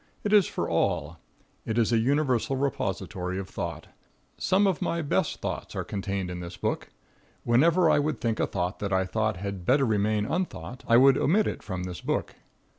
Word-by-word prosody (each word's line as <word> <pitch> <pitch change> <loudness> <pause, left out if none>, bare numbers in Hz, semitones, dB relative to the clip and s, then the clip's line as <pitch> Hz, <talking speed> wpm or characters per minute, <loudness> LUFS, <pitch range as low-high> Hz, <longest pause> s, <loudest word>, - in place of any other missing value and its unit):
It 210 - 0
is 205 -4 +6
for - - -3
all. 80 +3 0 0.4
It 110 - -3
is 115 -1 +2
a 115 - +4
universal 135 0 +1
repository 95 -9 -2
of 95 -1 -4
thought. 85 -5 -5 0.5
Some 195 +2 +2
of 190 -5 +1
my 170 -1 -1
best 155 +4 0
thoughts - - -4
are - - -2
contained 95 -2 -3
in 90 - -5
this 85 0 -7
book. - - -2 0.5
Whenever 165 +9 +4
I 145 - +4
would 150 +1 -1
think 115 -2 -1
a - - +2
thought 90 0 -3
that 100 -1 -3
I 95 0 +2
thought 110 +1 -1
had 100 -1 -5
better 135 +8 +3
remain 105 -1 +1
unthought, 130 - -4
I 115 - +6
would 135 +1 +6
omit 205 +7 +3
it - - -3
from 95 -3 -5
this 90 -1 -6
book. - - -2
110 Hz, 190 wpm, -27 LUFS, 95-140 Hz, 0.5 s, is